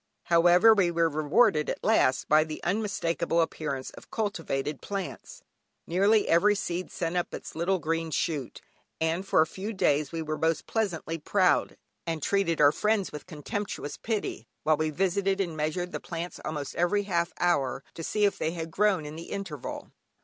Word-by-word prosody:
However, 175 +6 +6
we 195 -5 +3
were 170 -1 +2
rewarded 155 +3 +3
at - - -4
last 130 -12 +3
by 155 +1 +5
the 155 -1 -6
unmistakable 170 -4 0
appearance 150 -5 -2
of - - -14
cultivated 160 -9 -2
plants. 205 - -6 0.4
Nearly 200 +5 +3
every 205 +5 +4
seed 180 -2 -3
sent 165 0 -3
up 175 - -1
its - - -8
little 175 +4 +1
green 165 0 -2
shoot, 150 -4 -2 0.4
and 165 +4 -1
for 160 - +4
a - - +4
few 195 +7 -6
days 150 -6 +1
we 165 -1 -3
were 155 0 -3
most 160 -1 +1
unpleasantly 170 -7 -2
proud, 185 +4 +2 0.3
and 165 -3 -2
treated 195 -5 +1
our 145 -1 +7
friends 210 +4 0
with 150 - -8
contemptuous 165 0 -5
pity, 220 -3 -3 0.2
while 155 - +4
we 155 0 0
visited 195 +4 0
and 175 -5 -1
measured 155 +4 -2
the - - -4
plants 170 +1 -6
almost 150 -2 -4
every 190 +4 +2
half 170 -3 0
hour, 140 -6 +1
to - - -7
see 210 +5 +1
if 200 - 0
they 160 - -1
had 165 -1 -5
grown 195 -3 +2
in 150 +1 -7
the 165 +1 -8
interval. 190 -9 -6
170 Hz, 175 wpm, -28 LUFS, 155-195 Hz, 0.4 s, our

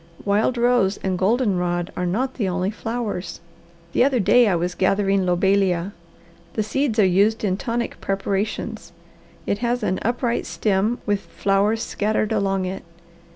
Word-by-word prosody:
Wild 210 +5 +1
rose 235 -5 +2
and 190 -1 0
golden 200 +1 +1
rod 175 0 -1
are 180 - -1
not 255 +9 -1
the 205 -7 -1
only 185 +2 -1
flowers. 220 -4 -4 0.5
The - - +4
other 265 -2 +2
day 240 +4 +5
I 190 - +2
was 175 +1 -1
gathering 195 0 +1
lobelia. 190 0 +1 0.6
The 215 - 0
seeds 240 +2 -1
are 210 - +5
used 200 +5 +2
in 190 -3 +1
tonic 235 +3 -3
preparations. 195 +2 -3 0.5
It 200 - -1
has 245 0 -1
an 185 - 0
upright 240 +1 -1
stem 210 +3 0
with 205 -2 +1
flowers 200 +3 0
scattered 215 +1 -1
along 195 -3 0
it. 185 +1 -4
200 Hz, 155 wpm, -22 LUFS, 190-230 Hz, 0.6 s, day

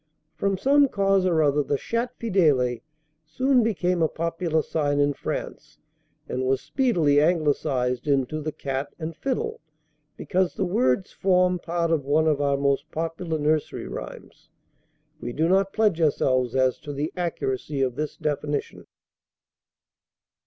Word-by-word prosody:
From 195 -1 -1
some 280 +7 +4
cause 195 -4 +2
or 165 -3 +3
other 145 0 +3
the 145 0 -1
'Chat 235 - -3
fidèle' 150 - +2 0.4
soon 255 - +2
became 180 -6 0
a 160 - +4
popular 165 -1 -1
sign 145 -2 0
in 145 0 +3
France, - - -6 0.5
and 130 - -2
was 130 0 +1
speedily 170 - +2
Anglicised 145 -6 0
into 140 +2 0
'The 155 +1 -3
Cat 135 +1 -4
and 160 -1 -5
Fiddle,' 265 - -3 0.6
because 185 -1 0
the 195 - -1
words 130 -2 +1
form 180 -1 +2
part 170 -1 -1
of 160 -4 +1
one 150 +3 +2
of 150 -2 +2
our 140 -1 +1
most 140 +2 0
popular 165 0 -3
nursery 155 0 -1
rhymes. - - -9 0.7
We 120 -3 -5
do 160 +5 +1
not 195 +2 +2
pledge 210 -7 +1
ourselves 130 -5 +1
as 130 -1 +2
to 145 -1 -7
the 145 +3 -3
accuracy 145 -5 -2
of 130 -2 0
this 150 +1 -4
definition." 150 -1 -3
155 Hz, 145 wpm, -25 LUFS, 140-180 Hz, 0.7 s, some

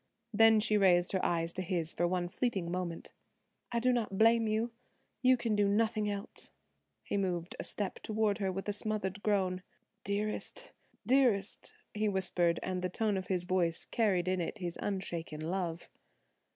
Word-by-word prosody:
Then 225 +1 +6
she 215 0 +3
raised 180 -2 +4
her 190 - 0
eyes 170 0 0
to 185 - -3
his 170 -3 -2
for 175 - +1
one 180 0 -1
fleeting 190 -4 -2
moment. 175 -2 -4 0.6
"I 235 - 0
do 250 +2 +3
not 220 -5 -1
blame 225 +1 +5
you. 220 +2 0 0.5
You 255 0 +5
can 230 -3 0
do 205 -1 +3
nothing 215 +1 +1
else." 200 -1 -4 0.5
He - - -2
moved 180 -3 -2
a - - -2
step 200 -3 -3
toward 215 -1 0
her 195 -2 0
with 195 +2 -5
a 205 - 0
smothered 205 -2 0
groan, 190 -3 +1 0.4
"Dearest, 215 - -2 0.3
dearest," 240 -7 +2 0.2
he 215 0 +1
whispered, 180 -3 +2
and 185 -1 -2
the 185 - -1
tone 210 +2 0
of 190 -1 -3
his 180 -2 0
voice 180 -2 0
carried 195 -6 +1
in 185 -1 +1
it 170 - -3
his 175 -4 -4
unshaken 170 -6 -3
love. 175 -2 -3
195 Hz, 170 wpm, -32 LUFS, 180-215 Hz, 0.6 s, Then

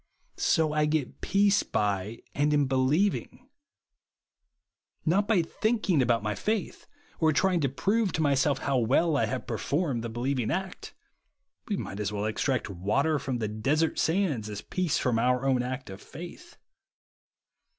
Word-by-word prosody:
So 155 -2 +2
I 150 0 +2
get 150 -3 -2
peace 200 0 +3
by, 105 +1 -2
and 150 +1 +2
in 145 -1 +3
believing; 145 - 0 1.6
not 195 +5 +2
by 200 -7 +3
thinking 205 - +1
about 120 -3 +2
my 105 0 -1
faith, 210 - -3 0.3
or 160 -1 +4
trying 180 +3 +2
to 140 -4 +1
prove 200 - 0
to 160 - 0
myself 140 -1 +2
how 135 -2 +2
well 140 +7 +2
I 115 -6 +2
have 125 +2 -4
performed 140 -6 -1
the 115 - -4
believing 120 +1 -1
act. 190 +1 -4 0.7
We 205 - -1
might 100 - -5
as 105 -1 -1
well 105 0 -2
extract 125 +4 -1
water 105 - 0
from 130 -3 -3
the 110 -2 -2
desert 140 +10 0
sands 160 - 0
as 105 0 -5
peace 180 -5 -1
from 120 -3 +1
our 125 +2 +1
own 130 -2 +2
act 130 -2 -5
of 95 - -10
faith. 260 - -11
140 Hz, 155 wpm, -28 LUFS, 120-170 Hz, 1.6 s, or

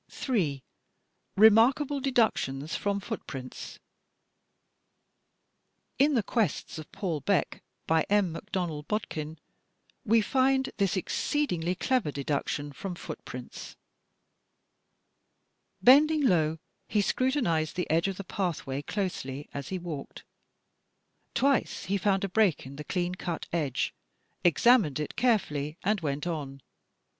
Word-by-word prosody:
J. 160 - -1 0.7
Remarkable 245 +7 +5
Deductions 220 - 0
from 200 0 -1
Footprints 135 - -7 2.2
In 285 +1 +4
"The 230 - +2
Quests 205 - -1
of 155 - -10
Paul 170 -6 -2
Beck," 200 -3 0 0.2
by 160 0 +2
M. 200 -4 +2
McDonnell 165 -5 -4
Bod 210 0 -1
kin, 155 +1 -5 0.7
we 230 -1 +4
find 265 +4 +2
this 195 -2 +1
exceedingly 180 - -1
clever 235 - 0
deduction 145 +1 -2
from 185 +4 -5
foot - - -8
prints: - - -8 2.1
Bending 295 +3 +6
low 160 -7 +3 0.3
he 210 - +2
scrutinized 230 - +1
the 180 - -2
edge 165 +4 +3
of 195 -1 -3
the 200 - -5
pathway 165 -8 -3
closely 145 -7 -4
as 140 -1 -5
he 190 - -2
walked. 170 -6 -7 1.1
Twice 275 0 +1
he 200 +2 0
found 195 0 +1
a 195 - -1
break 195 -7 +2
in 135 +1 -9
the 150 - -6
clean 180 +2 -1
cut 175 -2 -4
edge, 145 -7 -1 0.5
examined 175 - +4
it 150 - -4
carefully 165 - 0
and 205 0 +1
went 145 -1 -2
on. 140 -6 -4
185 Hz, 120 wpm, -28 LUFS, 150-220 Hz, 2.2 s, Bending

